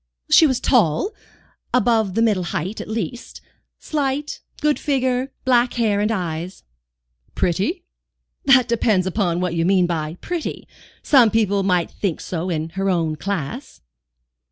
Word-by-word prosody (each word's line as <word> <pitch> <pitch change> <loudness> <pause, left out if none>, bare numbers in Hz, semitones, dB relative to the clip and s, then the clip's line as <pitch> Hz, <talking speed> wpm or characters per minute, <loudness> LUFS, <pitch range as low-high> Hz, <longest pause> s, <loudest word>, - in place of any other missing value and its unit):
"She 320 - +7
was 260 -3 0
tall, 240 - +2 0.6
above 225 -6 +2
the 225 - +3
middle 205 -6 +1
height, 185 +4 -3
at - - -8
least; 220 +1 -5 0.4
slight, 290 -1 -3 0.2
good 300 -1 +1
figure, 260 -2 0
black 245 -1 +3
hair 215 -4 +1
and 210 +2 +1
eyes." 175 -2 -4 0.7
"Pretty?" 200 - -1 0.6
"That 265 -3 +5
depends 215 -5 +1
upon 180 -3 0
what 180 -2 -1
you 165 -1 0
mean 185 0 +3
by 160 -1 -3
'pretty.' 350 -3 -5 0.4
Some 255 -6 +5
people 210 -3 +1
might 180 -3 +1
think 190 -6 -3
so, 175 +1 -4
in 160 -2 -2
her 195 +3 -2
own 165 -4 0
class." 195 - -5
205 Hz, 140 wpm, -21 LUFS, 175-250 Hz, 0.7 s, She